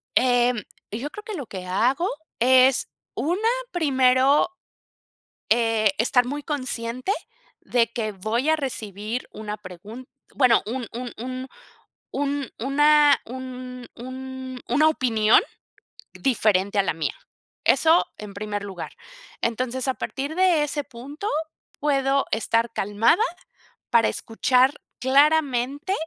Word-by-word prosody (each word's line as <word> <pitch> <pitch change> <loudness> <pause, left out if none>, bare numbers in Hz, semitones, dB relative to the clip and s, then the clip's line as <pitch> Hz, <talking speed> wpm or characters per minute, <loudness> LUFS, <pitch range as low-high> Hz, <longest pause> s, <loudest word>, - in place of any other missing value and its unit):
Em, 245 -1 +3 0.3
yo 235 +8 -4
creo 420 +6 -9
que 430 - -6
lo 285 -7 -5
que 185 -3 -7
hago 250 - +1 0.3
es 255 +2 +5 0.3
una, 365 +8 0 0.2
primero, 270 -2 +3 1.0
eh, 225 -2 +3
estar 245 +2 +3
muy 290 +3 -4
consciente 255 0 -3 0.5
de 235 -2 +2
que 220 -2 -2
voy 220 +8 -1
a 315 - +5
recibir 225 -5 -4
una 210 -1 -6
pregun 210 +6 -10 0.3
bueno, 255 -4 +5
un 240 +1 -4
un 245 +1 -5
un 255 +2 -5 0.6
un 280 -1 -2
una 295 +3 +5
un 255 0 -7
un 260 +1 -7
una 295 +6 +4
opinión 225 -7 +3 0.7
diferente 205 -6 +1
a - - +4
la - - 0
mía. 160 -1 -2 0.5
Eso 325 +2 +5
en 210 -1 -9
primer 205 0 -4
lugar. 190 -4 -7 0.5
Entonces, 250 +3 -1
a 265 - +2
partir 280 +4 -4
de 360 -4 +4
ese 295 0 -2
punto, 280 - -8 0.5
puedo 275 -1 +2
estar 230 +1 +1
calmada, 225 - +2 0.7
para 230 -1 +4
escuchar 255 +4 +2 0.3
claramente 280 +3 +2
255 Hz, 115 wpm, -24 LUFS, 225-280 Hz, 1.0 s, es